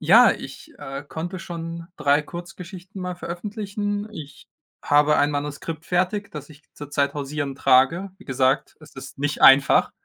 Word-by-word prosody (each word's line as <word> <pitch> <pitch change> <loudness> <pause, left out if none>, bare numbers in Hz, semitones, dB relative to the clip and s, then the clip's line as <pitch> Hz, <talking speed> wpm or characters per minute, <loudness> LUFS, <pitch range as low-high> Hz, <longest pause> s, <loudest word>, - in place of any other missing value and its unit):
eJa, - - +7
ich, - - -10
äh, 135 +1 -6
konnte 175 +5 -5
schon 170 -1 -6
3 145 +1 +3
Kurzgeschichten 180 +3 -9
mal 180 0 -3
veröffentlichen. 205 +3 -4
Ich 145 -6 -10 0.3
habe 150 +1 +4
ein 145 - +3
Manuskript 145 +2 -4
fertig, 185 +3 0
das 150 -1 -9
ich 150 0 -16
zurzeit 145 -1 -1
hausieren 145 -1 -3
trage. 135 +8 +3
Wie 200 - -16
gesagt, 130 +1 0
es 155 - -16
ist 135 0 -10
nicht 145 +1 -2
einfach. 135 +1 +7
155 Hz, 150 wpm, -23 LUFS, 145-180 Hz, 0.3 s, eJa